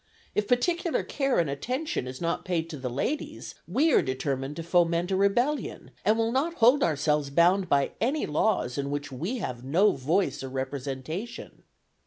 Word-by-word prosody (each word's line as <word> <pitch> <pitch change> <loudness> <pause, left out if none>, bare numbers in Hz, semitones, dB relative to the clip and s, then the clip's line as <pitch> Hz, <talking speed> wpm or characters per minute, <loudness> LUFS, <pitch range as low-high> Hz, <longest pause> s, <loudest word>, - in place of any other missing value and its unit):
If 210 -1 0
particular 340 +7 +1
care 275 -2 0
and 170 - +2
attention 240 - -3
is 130 0 -7
not 170 0 -1
paid 165 -2 -2
to 150 - -6
the 130 -1 -4
ladies, 300 - -3
we 275 - +2
are - - +6
determined 135 +1 -2
to 165 - -5
foment 170 +1 +2
a - - +2
rebellion, 240 +10 0
and 215 +1 +3
will 225 0 +1
not 295 +7 0
hold 250 +3 +5
ourselves 150 - +1
bound 175 +5 +3
by 140 -1 +2
any 270 +7 +1
laws 150 - 0
in 140 0 -2
which 145 0 -4
we 175 - -3
have 125 - -5
no 175 +11 +4
voice 155 +8 0
or 135 - -5
representation. 135 - -5
170 Hz, 175 wpm, -27 LUFS, -, -, are